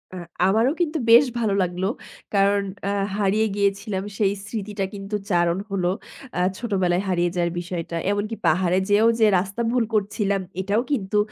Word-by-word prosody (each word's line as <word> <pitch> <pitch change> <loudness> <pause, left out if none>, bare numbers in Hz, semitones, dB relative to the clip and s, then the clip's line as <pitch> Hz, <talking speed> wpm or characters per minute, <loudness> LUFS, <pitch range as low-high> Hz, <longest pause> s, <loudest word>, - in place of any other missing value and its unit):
আ - - -6 0.3
আমারও 225 +7 +3
কিন্তু 320 -1 0
বেশ 240 +5 +8
ভালো 220 -4 +1
লাগলো। 180 +1 -2 0.5
কারণ 200 0 +3 0.3
আ - - 0 0.3
হারিয়ে 210 +2 +2
গিয়েছিলাম 200 -1 -1
সেই 200 -2 +2
স্মৃতিটা 210 -2 -3
কিন্তু 200 +1 -5 0.2
চারণ 175 0 +2
হলো। 185 -3 -1 0.5
আ - - +1 0.2
ছোটবেলায় 190 -5 0
হারিয়ে 175 -1 +1
যাওয়ার 170 -1 0
বিষয়টা। 170 -1 -5 0.2
এমনকি 210 +2 -2
পাহাড়ে 180 0 +2
যেয়েও 215 +3 +5
যে 220 - +6
রাস্তা 195 +5 -4
ভুল 245 -2 +2
করছিলাম 200 -1 0 0.2
এটাও 205 +4 +1
কিন্তু 210 -6 0
200 Hz, 155 wpm, -23 LUFS, 185-215 Hz, 0.5 s, বেশ